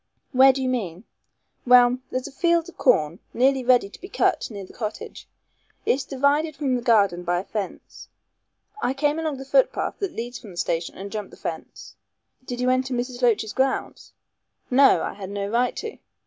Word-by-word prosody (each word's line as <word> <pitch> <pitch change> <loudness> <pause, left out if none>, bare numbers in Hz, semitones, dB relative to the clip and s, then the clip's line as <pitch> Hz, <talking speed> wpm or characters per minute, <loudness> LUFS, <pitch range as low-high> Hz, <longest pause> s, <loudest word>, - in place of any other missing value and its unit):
"Where 265 0 +7
do 265 0 -3
you - - 0
mean?" 200 -8 -3 0.6
"Well, 245 0 +6
there's 255 +1 -3
a - - -10
field 340 +3 +1
of 355 - -12
corn 170 - +2 0.2
nearly 265 +2 +3
ready 245 -4 +4
to 200 - -15
be 380 - -9
cut - - +1
near 200 -4 -7
the - - -16
cottage. 215 -2 -6 0.6
It's 270 - +1
divided 285 +3 +1
from 275 -3 0
the 245 - -2
garden 200 -7 +3
by 175 0 0
a - - -5
fence. 200 -2 -6 0.7
I 260 - 0
came 295 +2 +1
along 310 -3 -2
the 270 - -8
foot - - +3
path - - -3
that 395 -4 -3
leads 240 +2 -5
from 220 - -12
the 175 - -12
station 170 0 -2
and 195 +1 -7
jumped 210 -2 -5
the - - -15
fence." - - -7 0.5
"Did 245 -1 -6
you 250 0 +2
enter 255 0 0
Miss 245 +1 -4
Loach's 220 -3 +2
grounds?" 265 0 -2 0.6
"No. 270 +2 +5
I - - -3
had 195 -2 -8
no 200 0 -3
right 240 +4 +1
to. 445 0 -6
250 Hz, 195 wpm, -24 LUFS, 210-270 Hz, 0.7 s, Where